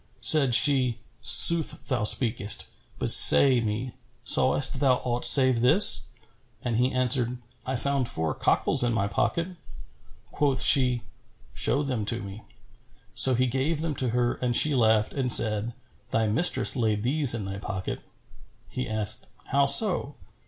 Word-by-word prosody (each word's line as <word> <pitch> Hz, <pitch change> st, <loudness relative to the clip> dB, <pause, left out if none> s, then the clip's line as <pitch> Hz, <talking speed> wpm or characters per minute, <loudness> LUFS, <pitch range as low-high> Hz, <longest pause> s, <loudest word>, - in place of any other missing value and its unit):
Said 125 Hz, +1 st, +3 dB
she, 130 Hz, -3 st, +1 dB, 0.2 s
"Sooth 150 Hz, +7 st, +5 dB
thou 125 Hz, -6 st, -3 dB
speakest: 110 Hz, -3 st, 0 dB, 0.3 s
but -, -, -2 dB
say 130 Hz, -3 st, +6 dB
me, 115 Hz, +3 st, -6 dB, 0.3 s
sawest 135 Hz, -1 st, +1 dB
thou 135 Hz, -3 st, +1 dB
aught 120 Hz, -1 st, -2 dB
save 130 Hz, -4 st, +5 dB
this?" 155 Hz, -, +4 dB, 0.6 s
And 120 Hz, -2 st, -4 dB
he 125 Hz, +2 st, -1 dB
answered, 125 Hz, -1 st, -2 dB, 0.3 s
"I 130 Hz, -, -4 dB
found 135 Hz, 0 st, -2 dB
four 80 Hz, -1 st, -3 dB
cockals -, -, -2 dB
in 120 Hz, -1 st, -2 dB
my 100 Hz, -2 st, -3 dB
pocket." 170 Hz, -, -4 dB, 0.8 s
Quoth 140 Hz, -3 st, -3 dB
she, 125 Hz, -4 st, +1 dB, 0.5 s
"Show 145 Hz, -, -2 dB
them 130 Hz, -6 st, -5 dB
to 115 Hz, +2 st, -2 dB
me." 100 Hz, +2 st, -11 dB, 0.7 s
So 130 Hz, -1 st, +5 dB
he 130 Hz, +2 st, -1 dB
gave 135 Hz, +5 st, -4 dB
them 160 Hz, -2 st, -5 dB
to 130 Hz, -, -3 dB
her 120 Hz, +1 st, -2 dB
and 125 Hz, -1 st, -3 dB
she 150 Hz, +3 st, +3 dB
laughed 110 Hz, -4 st, -1 dB
and 130 Hz, -3 st, -2 dB
said, 110 Hz, 0 st, +2 dB, 0.4 s
"Thy 115 Hz, 0 st, -2 dB
mistress 115 Hz, +12 st, 0 dB
laid 110 Hz, -4 st, -3 dB
these 135 Hz, -1 st, +2 dB
in 105 Hz, -4 st, -6 dB
thy 95 Hz, +1 st, -8 dB
pocket." 95 Hz, -1 st, -8 dB, 0.7 s
He 130 Hz, -2 st, -8 dB
asked, 110 Hz, -2 st, -2 dB, 0.2 s
"How 140 Hz, +1 st, 0 dB
so?" 150 Hz, -1 st, +2 dB
125 Hz, 150 wpm, -23 LUFS, 115-135 Hz, 0.8 s, say